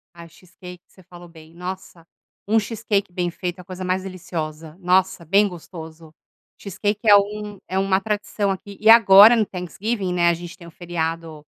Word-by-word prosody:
Ah, 170 Hz, 0 st, -12 dB
cheesecake 180 Hz, +1 st, -14 dB
você 185 Hz, -, -21 dB
falou 175 Hz, 0 st, -14 dB
bem. 160 Hz, -1 st, -17 dB
Nossa, 180 Hz, -1 st, -8 dB, 0.4 s
um 220 Hz, +1 st, +3 dB
cheesecake 210 Hz, -3 st, -2 dB
bem 175 Hz, 0 st, -2 dB
feito 175 Hz, +1 st, -6 dB
é -, -, -8 dB
a -, -, -18 dB
coisa 185 Hz, 0 st, -8 dB
mais 185 Hz, +1 st, -1 dB
deliciosa. 165 Hz, -4 st, -7 dB
Nossa, 185 Hz, -1 st, +1 dB
bem 200 Hz, +5 st, +3 dB
gostoso. 160 Hz, -3 st, -11 dB, 0.5 s
Cheesecake 205 Hz, +2 st, -3 dB
é 205 Hz, -, +9 dB
um 205 Hz, 0 st, -1 dB
é 190 Hz, -, -3 dB
uma 195 Hz, 0 st, +1 dB
tradição 205 Hz, -1 st, -2 dB
aqui. 195 Hz, +1 st, -8 dB
E 220 Hz, -, +3 dB
agora 225 Hz, 0 st, +8 dB
no 220 Hz, -2 st, +1 dB
Thanksgiving, 190 Hz, +2 st, -4 dB
né, 175 Hz, -1 st, +3 dB
a 170 Hz, -, +2 dB
gente 175 Hz, 0 st, -9 dB
tem 170 Hz, -, -13 dB
o 170 Hz, -, -13 dB
feriado 165 Hz, -3 st, -5 dB
185 Hz, 180 wpm, -21 LUFS, 170-200 Hz, 0.5 s, é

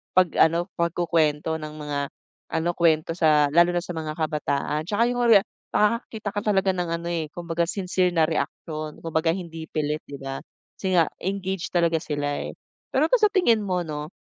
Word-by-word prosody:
pag 185 Hz, -1 st, +5 dB
ano 170 Hz, +3 st, +3 dB
pagkukwento 160 Hz, -2 st, +1 dB
ng 155 Hz, -1 st, -7 dB
mga 150 Hz, -2 st, -3 dB, 0.6 s
ano 160 Hz, +1 st, +1 dB
kwento 160 Hz, -2 st, +3 dB
sa 150 Hz, -3 st, +4 dB
lalo 175 Hz, +3 st, +5 dB
na 175 Hz, -, +1 dB
sa -, -, -6 dB
mga 155 Hz, -1 st, -3 dB
kabataan 150 Hz, -1 st, -1 dB
'tsaka 225 Hz, +4 st, +2 dB
yung 245 Hz, -, -2 dB
rea 215 Hz, -4 st, +8 dB, 0.3 s
nakakakita 215 Hz, 0 st, +1 dB
ka 205 Hz, -, -2 dB
talaga 195 Hz, -2 st, +2 dB
ng 180 Hz, -1 st, -2 dB
ano, 170 Hz, 0 st, -3 dB
eh, 165 Hz, -3 st, -2 dB
kumbaga 170 Hz, -1 st, -1 dB
sincere 180 Hz, -1 st, 0 dB
na 165 Hz, -, +4 dB
reaksyon 155 Hz, 0 st, -4 dB
kumbaga 165 Hz, 0 st, +1 dB
hindi 165 Hz, -3 st, -7 dB
pilit 150 Hz, 0 st, -1 dB
di 140 Hz, -, -7 dB
ba, 135 Hz, 0 st, -4 dB, 0.4 s
kasi 190 Hz, -1 st, -1 dB
nga 165 Hz, -3 st, +4 dB
engage 190 Hz, -1 st, -2 dB
talaga 170 Hz, -2 st, +3 dB
sila, 145 Hz, -2 st, -2 dB
eh. -, -, -7 dB, 0.4 s
Pero 300 Hz, +5 st, +3 dB
ba -, -, +6 dB
sa 425 Hz, -, +6 dB
tingin 240 Hz, -, +4 dB
mo 180 Hz, -2 st, 0 dB
'no, 150 Hz, -2 st, -5 dB
170 Hz, 180 wpm, -25 LUFS, 155-185 Hz, 0.6 s, rea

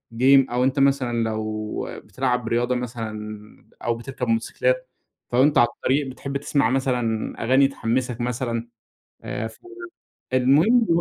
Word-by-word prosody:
game، 135 Hz, +2 st, +5 dB
أو 125 Hz, +1 st, +1 dB
أنتَ 135 Hz, +2 st, +1 dB
مثلًا 130 Hz, -4 st, +2 dB
لو 110 Hz, -1 st, -3 dB, 0.2 s
بتلعَب 125 Hz, -3 st, -1 dB
رياضة 120 Hz, +2 st, +1 dB
مثلًا 110 Hz, -3 st, -5 dB, 0.5 s
أو 120 Hz, -1 st, 0 dB
بتركَب 125 Hz, +1 st, -5 dB
موتوسيكلات، -, -, 0 dB, 0.4 s
ف -, -, -17 dB
وأنتَ 140 Hz, +4 st, +4 dB
على 120 Hz, -, +6 dB
الطريق 140 Hz, +2 st, +1 dB
بتحِب 135 Hz, +1 st, -4 dB
تسمَع 140 Hz, -4 st, +1 dB
مثلًا 125 Hz, -4 st, 0 dB
أغاني 130 Hz, +3 st, +5 dB
تحمَّسك 125 Hz, -2 st, -2 dB
مثلًا. 120 Hz, -1 st, -2 dB, 0.6 s
آآ 110 Hz, -, -3 dB
ف 110 Hz, -, -15 dB, 0.7 s
المهم 155 Hz, -, +4 dB
125 Hz, 130 wpm, -23 LUFS, 115-135 Hz, 0.7 s, على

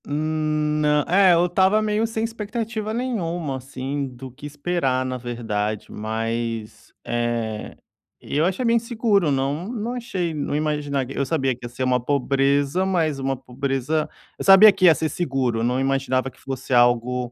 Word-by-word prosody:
Hum, 155 Hz, 0 st, -1 dB
nã 150 Hz, -1 st, +2 dB
é 185 Hz, 0 st, +5 dB
eu 170 Hz, +1 st, +3 dB
estava 190 Hz, +4 st, +3 dB
meio 215 Hz, +1 st, 0 dB
sem 225 Hz, 0 st, -3 dB
expectativa 225 Hz, -1 st, -4 dB
nenhuma, 175 Hz, -, -2 dB
assim, 135 Hz, +2 st, -4 dB
do 130 Hz, 0 st, -10 dB
que 135 Hz, +4 st, -9 dB
esperar, 145 Hz, -4 st, -1 dB
na 130 Hz, 0 st, -3 dB
verdade, 110 Hz, -4 st, -3 dB
mas, 115 Hz, +1 st, -4 dB
eh, 120 Hz, -2 st, -2 dB, 0.4 s
eu 150 Hz, +3 st, -1 dB
achei 190 Hz, +7 st, -1 dB
bem 230 Hz, 0 st, +4 dB
seguro. 220 Hz, -7 st, +1 dB
Não 140 Hz, +6 st, -1 dB
não 235 Hz, 0 st, -4 dB
achei 195 Hz, -9 st, -3 dB
não 145 Hz, -1 st, -2 dB
imaginari 145 Hz, -3 st, -2 dB
eu 140 Hz, -, 0 dB
sabia 135 Hz, -3 st, 0 dB
que 125 Hz, +1 st, -11 dB
ia -, -, -5 dB
ser 125 Hz, +2 st, -5 dB
uma 125 Hz, -1 st, +2 dB
pobreza, 140 Hz, +4 st, +1 dB
mas 165 Hz, -7 st, 0 dB
uma 135 Hz, 0 st, -1 dB
pobreza 135 Hz, +4 st, -2 dB, 0.3 s
eu -, -, -3 dB
sabia 195 Hz, +2 st, +9 dB
que 185 Hz, -, +1 dB
ia 165 Hz, -3 st, +8 dB
ser 160 Hz, -, -1 dB
seguro, 130 Hz, -9 st, -1 dB
não 125 Hz, +2 st, +1 dB
imaginava 135 Hz, -1 st, 0 dB
que -, -, -24 dB
fosse 135 Hz, -1 st, -5 dB
algo 120 Hz, 0 st, +2 dB
145 Hz, 165 wpm, -23 LUFS, 130-180 Hz, 0.4 s, sabia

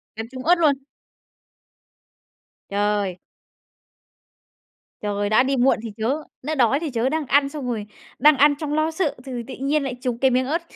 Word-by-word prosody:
Cắn 225 Hz, +1 st, -5 dB
trúng 255 Hz, -1 st, -7 dB
ớt 350 Hz, +2 st, +6 dB
luôn? 305 Hz, -4 st, +4 dB, 2.0 s
Trời! 205 Hz, -2 st, 0 dB, 1.8 s
Trời, 205 Hz, 0 st, -1 dB
đã 215 Hz, +4 st, +5 dB
đi 270 Hz, +1 st, 0 dB
muộn 255 Hz, 0 st, +3 dB
thì 225 Hz, -, -5 dB
chớ, 265 Hz, +8 st, -1 dB, 0.2 s
nó 310 Hz, +4 st, -3 dB
đói 265 Hz, +1 st, +3 dB
thì 325 Hz, -1 st, -3 dB
chớ, 245 Hz, 0 st, 0 dB
đang 315 Hz, 0 st, -1 dB
ăn 275 Hz, +1 st, +3 dB
xong 280 Hz, -4 st, -6 dB
rồi 220 Hz, -4 st, -3 dB, 0.3 s
đang 295 Hz, +1 st, +6 dB
ăn 290 Hz, +1 st, +5 dB
trong 300 Hz, -2 st, -3 dB
lo 310 Hz, +1 st, +1 dB
sợ 320 Hz, -2 st, -1 dB
thừ 250 Hz, -3 st, -5 dB
tị 270 Hz, -, -8 dB
nhiên 280 Hz, +3 st, 0 dB
lại 260 Hz, -2 st, -3 dB
trúng 250 Hz, -3 st, -2 dB
cái 265 Hz, +1 st, +3 dB
miếng 255 Hz, +1 st, +2 dB
ớt, 325 Hz, +6 st, -1 dB
265 Hz, 180 wpm, -22 LUFS, 230-295 Hz, 2.0 s, ớt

